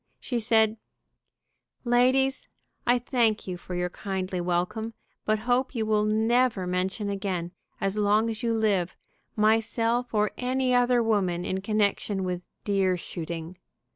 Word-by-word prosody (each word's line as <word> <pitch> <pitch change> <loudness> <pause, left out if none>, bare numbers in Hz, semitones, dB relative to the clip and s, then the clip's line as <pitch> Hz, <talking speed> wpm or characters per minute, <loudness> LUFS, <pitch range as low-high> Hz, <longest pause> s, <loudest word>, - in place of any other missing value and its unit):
She 245 -3 -2
said: 220 -1 +3 1.1
"Ladies, 255 +2 +2 0.4
I 245 +1 +5
thank 235 -3 +1
you 185 - -4
for 180 +1 -7
your 180 0 -1
kindly 190 -2 -3
welcome, 180 +6 -1 0.3
but 215 0 +2
hope 255 +2 +1
you 225 -2 0
will 215 -1 +2
never 220 -1 +2
mention 185 +3 -1
again, 190 -4 -2 0.3
as 195 +2 0
long 210 +2 +3
as 225 0 -4
you 235 -2 0
live, 205 -6 +1 0.4
myself 225 +3 +1
or 210 -1 +1
any 255 0 +1
other 245 -1 +4
woman 185 -6 +1
in 190 0 -2
connection 205 -1 0
with 180 -1 -4 0.2
deer 195 -3 +1
shooting. 170 0 -6
215 Hz, 140 wpm, -27 LUFS, 185-235 Hz, 1.1 s, I